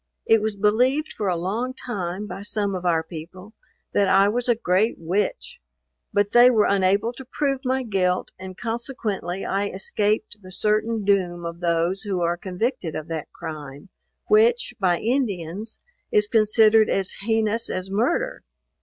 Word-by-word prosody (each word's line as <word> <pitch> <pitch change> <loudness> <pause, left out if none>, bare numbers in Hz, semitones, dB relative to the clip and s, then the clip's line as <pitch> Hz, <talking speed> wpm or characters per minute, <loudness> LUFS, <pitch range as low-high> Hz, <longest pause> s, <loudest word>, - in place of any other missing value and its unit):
It 225 -1 +4
was 215 -1 -1
believed 250 +9 +1
for 210 - -3
a 175 - 0
long 225 +9 -2
time, 195 -6 -4
by 195 -1 -7
some 205 -1 -1
of 180 -1 -3
our 165 -2 +2
people, 180 +5 -10 0.4
that 200 -1 +3
I 195 +1 +5
was 245 +3 -1
a 240 - +5
great 215 0 +1
witch; 185 +5 -2 0.5
but 205 0 +1
they 240 +1 +7
were 220 -4 +3
unable 200 +4 +2
to 265 - -10
prove 275 +1 -2
my 260 0 0
guilt, 185 -5 0
and 185 0 -9
consequently 225 -6 -3
I 200 +1 0
escaped 210 +2 -1
the 185 -1 -12
certain 215 +2 +1
doom 180 -4 +1
of 170 0 -6
those 170 +2 0
who 200 -4 -2
are 170 0 +1
convicted 185 - -3
of 155 +1 -6
that 160 -2 -5
crime, 145 +1 -8 0.4
which, 460 +3 +3
by 180 -3 +2
Indians, 215 - -2 0.3
is 210 0 +3
considered 220 0 +4
as 195 -1 0
heinous 225 +1 +1
as 185 +1 -4
murder. 315 - 0
205 Hz, 160 wpm, -23 LUFS, 180-225 Hz, 0.5 s, they